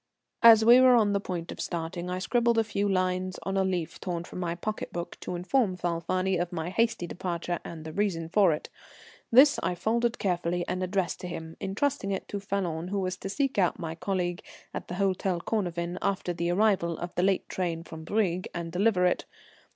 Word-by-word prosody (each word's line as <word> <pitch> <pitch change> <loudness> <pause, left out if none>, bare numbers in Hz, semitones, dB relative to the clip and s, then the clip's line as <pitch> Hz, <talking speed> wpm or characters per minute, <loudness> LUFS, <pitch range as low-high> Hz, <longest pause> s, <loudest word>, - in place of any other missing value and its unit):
As 225 -1 +8
we 240 +2 +9
were 255 -1 +7
on 210 -3 +3
the 200 - +2
point 175 -4 -5
of - - -6
starting, 170 +1 -4
I 180 - -2
scribbled 235 +4 +2
a 225 - +4
few 205 -1 -1
lines 185 -1 0
on 195 - -2
a 195 - +3
leaf 175 -3 -2
torn 175 -2 -3
from 180 - -8
my 170 -2 -2
pocket 215 +5 -4
book 175 0 -5
to - - -5
inform 185 +2 +1
Falfani 180 +2 0
of 175 - -3
my 170 0 -3
hasty 225 -2 +1
departure 175 0 -3
and 160 -2 -8
the 160 - -6
reason 180 -5 -1
for 190 +1 +4
it. 150 - -3 0.6
This 265 +5 +7
I 180 - -1
folded 235 +5 0
carefully 175 -2 -1
and 180 0 -2
addressed 185 -1 -1
to 180 - -6
him, 160 -2 -7
entrusting 200 +1 -1
it 195 -1 -3
to 205 - -3
Falloon, 180 -4 -2
who 200 +2 -1
was 185 -1 -1
to 195 - -6
seek 270 +1 0
out 180 -3 +2
my 165 -2 -4
colleague 175 0 -2 0.3
at - - -5
the 175 - -5
Hôtel 190 -2 0
Cornavin 175 -4 -2
after 190 -3 -1
the 170 0 -2
arrival 180 -3 +2
of 175 0 -6
the - - 0
late 190 0 +1
train 170 -3 -2
from 160 -1 -9
Brieg, 185 -1 0
and 170 -1 -4
deliver 185 0 +2
it. 180 - +1
185 Hz, 205 wpm, -28 LUFS, 175-200 Hz, 0.6 s, we